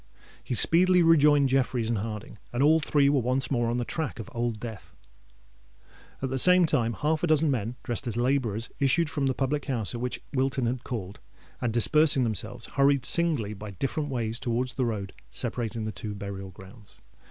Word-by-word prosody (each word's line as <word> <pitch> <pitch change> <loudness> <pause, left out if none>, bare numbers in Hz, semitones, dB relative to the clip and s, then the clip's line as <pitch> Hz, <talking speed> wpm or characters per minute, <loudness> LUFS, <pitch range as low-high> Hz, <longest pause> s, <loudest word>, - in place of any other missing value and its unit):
He 125 - -3
speedily 180 +7 +4
rejoined 150 -4 +5
Jeffreys 125 -3 0
and 115 -2 0
Harding; 105 0 -6
and 120 +3 0
all 160 +2 +5
three 145 -2 +2
were 140 -2 +3
once 130 +3 -1
more 120 -3 +1
on 120 - -1
the 120 - -2
track 160 0 -4
of 115 - -8
Old 120 -2 -2
Death. 115 -3 -9 1.3
At 135 - -2
the 130 - -1
same 180 +4 +6
time, 115 -7 +1
half 155 +5 -1
a 175 - +1
dozen 155 -1 +3
men, 120 -1 -2
dressed 120 +2 -3
as 115 -1 -2
labourers, 120 -3 -1
issued 145 +4 +2
from 140 -3 -1
the 130 - 0
public 140 +2 -1
house 115 -9 -2
at 120 - -5
which 125 0 -3
Wilton 135 -1 0
had 125 +1 -2
called; 100 -6 -6 0.4
and, 120 - 0
dispersing 140 +4 +4
themselves, 110 +1 -2
hurried 140 -2 +2
singly 150 -12 +2
by 105 +1 -8
different 135 - -3
ways 115 -3 -2
towards 125 +1 -2
the 130 - -1
road 105 -4 -4 0.2
separating 115 -2 -3
the 110 - -3
two 105 +1 -6
burial 100 -1 -6
grounds. 95 +4 -15
125 Hz, 190 wpm, -27 LUFS, 115-140 Hz, 1.3 s, same